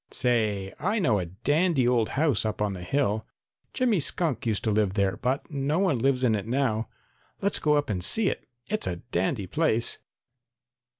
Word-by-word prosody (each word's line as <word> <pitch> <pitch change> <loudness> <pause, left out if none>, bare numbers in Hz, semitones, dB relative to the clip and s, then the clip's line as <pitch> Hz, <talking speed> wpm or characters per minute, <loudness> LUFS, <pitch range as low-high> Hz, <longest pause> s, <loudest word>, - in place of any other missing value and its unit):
Say, 105 -6 0
I 205 +8 0
know 140 - +2
a 90 - -3
dandy 145 - +1
old 120 -3 +2
house 145 -7 +3
up 110 -1 -2
on 105 -1 0
the 90 - -7
hill. 110 +1 0 0.5
Jimmy 245 -7 +1
Skunk 140 - -1
used 110 -2 0
to 110 - +1
live 105 -2 +1
there, 100 -3 +1
but 130 - -2
no 145 +2 0
one 180 -10 +2
lives 130 +1 +1
in 120 -3 +3
it 105 -1 -2
now. 115 -3 0 0.5
Let's 200 +1 0
go 150 -1 +3
up 145 0 +1
and 95 -5 -2
see 195 - +3
it. - - -3 0.2
It's 215 0 -2
a 90 - -1 0.2
dandy 95 +4 0
place." 120 - +1
120 Hz, 185 wpm, -27 LUFS, 105-150 Hz, 0.5 s, house